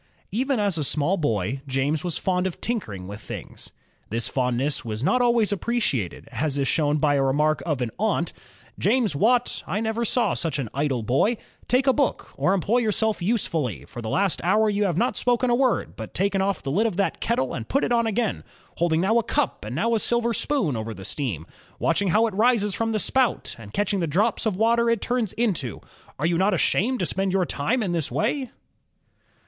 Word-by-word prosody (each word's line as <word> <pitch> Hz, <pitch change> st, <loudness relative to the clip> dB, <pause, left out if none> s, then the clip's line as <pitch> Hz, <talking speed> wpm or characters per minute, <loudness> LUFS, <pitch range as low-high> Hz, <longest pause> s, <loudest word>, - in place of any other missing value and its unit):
Even 255 Hz, +4 st, 0 dB
as 200 Hz, -5 st, +1 dB
a -, -, 0 dB
small 150 Hz, +6 st, +2 dB
boy, 120 Hz, -, -1 dB
James 140 Hz, +4 st, 0 dB
was 175 Hz, -3 st, -1 dB
fond 185 Hz, 0 st, 0 dB
of 185 Hz, -, -6 dB
tinkering 110 Hz, -, -3 dB
with 100 Hz, +2 st, -8 dB
things. -, -, -8 dB, 0.4 s
This 115 Hz, +2 st, +1 dB
fondness 130 Hz, +2 st, 0 dB
was 110 Hz, +1 st, -4 dB
not 250 Hz, -, +3 dB
always 235 Hz, -3 st, +3 dB
appreciated, 195 Hz, -, -1 dB
as 140 Hz, +3 st, -1 dB
is 140 Hz, -1 st, 0 dB
shown 150 Hz, -1 st, +2 dB
by 150 Hz, -1 st, +2 dB
a 140 Hz, -, +2 dB
remark 150 Hz, +3 st, +2 dB
of 145 Hz, -6 st, 0 dB
an 115 Hz, -, -3 dB
aunt: 195 Hz, -5 st, 0 dB, 0.5 s
"James 215 Hz, -, +2 dB
Watt, 240 Hz, -, +2 dB
I 190 Hz, +6 st, -1 dB
never 225 Hz, +1 st, -1 dB
saw 240 Hz, +2 st, +1 dB
such 165 Hz, -4 st, -2 dB
an 130 Hz, -6 st, -3 dB
idle 135 Hz, -4 st, -1 dB
boy; 140 Hz, -, +2 dB, 0.3 s
take 255 Hz, +2 st, +2 dB
a 265 Hz, -, +5 dB
book 280 Hz, -2 st, -1 dB
or 190 Hz, -, +2 dB
employ 205 Hz, +6 st, +1 dB
yourself 220 Hz, -2 st, 0 dB
usefully; 170 Hz, -, -1 dB
for 120 Hz, -, -8 dB
the 110 Hz, -, -4 dB
last 195 Hz, -, 0 dB
hour 210 Hz, +4 st, +3 dB
you 205 Hz, 0 st, +1 dB
have 175 Hz, -4 st, 0 dB
not 245 Hz, +6 st, +1 dB
spoken 245 Hz, 0 st, +1 dB
a -, -, +4 dB
word, 255 Hz, -1 st, +1 dB
but 110 Hz, -2 st, -8 dB
taken 195 Hz, +1 st, +1 dB
oflF 195 Hz, 0 st, -1 dB
the 135 Hz, -, -2 dB
lid 215 Hz, +10 st, +2 dB
of 185 Hz, -, -4 dB
that 195 Hz, -, 0 dB
kettle 225 Hz, -, 0 dB
and 115 Hz, -3 st, -6 dB
put 275 Hz, -, +1 dB
it -, -, 0 dB
on 235 Hz, -1 st, +3 dB
again, 220 Hz, 0 st, -1 dB, 0.3 s
holding 165 Hz, -1 st, +2 dB
now 220 Hz, +5 st, +3 dB
a -, -, -1 dB
cup 290 Hz, +4 st, -1 dB
and 110 Hz, +4 st, -5 dB
now 230 Hz, +10 st, +1 dB
a 225 Hz, -, +2 dB
silver 235 Hz, +1 st, +1 dB
spoon 220 Hz, -, +1 dB
over 110 Hz, 0 st, -4 dB
the 95 Hz, -, -9 dB
steam, 105 Hz, -, -3 dB, 0.3 s
watching 180 Hz, +4 st, +1 dB
how 215 Hz, +6 st, +4 dB
it 220 Hz, -, -2 dB
rises 215 Hz, -1 st, +2 dB
from 225 Hz, +2 st, -1 dB
the 220 Hz, -, 0 dB
spout, 255 Hz, +3 st, +1 dB
and 100 Hz, -3 st, -11 dB
catching 205 Hz, -, 0 dB
the 170 Hz, -, 0 dB
drops 210 Hz, +9 st, +1 dB
of 210 Hz, -, 0 dB
water 235 Hz, +2 st, +3 dB
it 230 Hz, -2 st, +2 dB
turns 240 Hz, -4 st, -1 dB
into. 180 Hz, -, -1 dB, 0.4 s
Are 150 Hz, -, -1 dB
you 170 Hz, 0 st, +1 dB
not 195 Hz, +1 st, +3 dB
ashamed 240 Hz, +8 st, +1 dB
to -, -, +1 dB
spend 190 Hz, +2 st, 0 dB
your 185 Hz, -1 st, +2 dB
time 220 Hz, -, 0 dB
in 190 Hz, -, -1 dB
this 165 Hz, -4 st, 0 dB
way?'' 255 Hz, +4 st, -1 dB
190 Hz, 215 wpm, -24 LUFS, 145-230 Hz, 0.5 s, a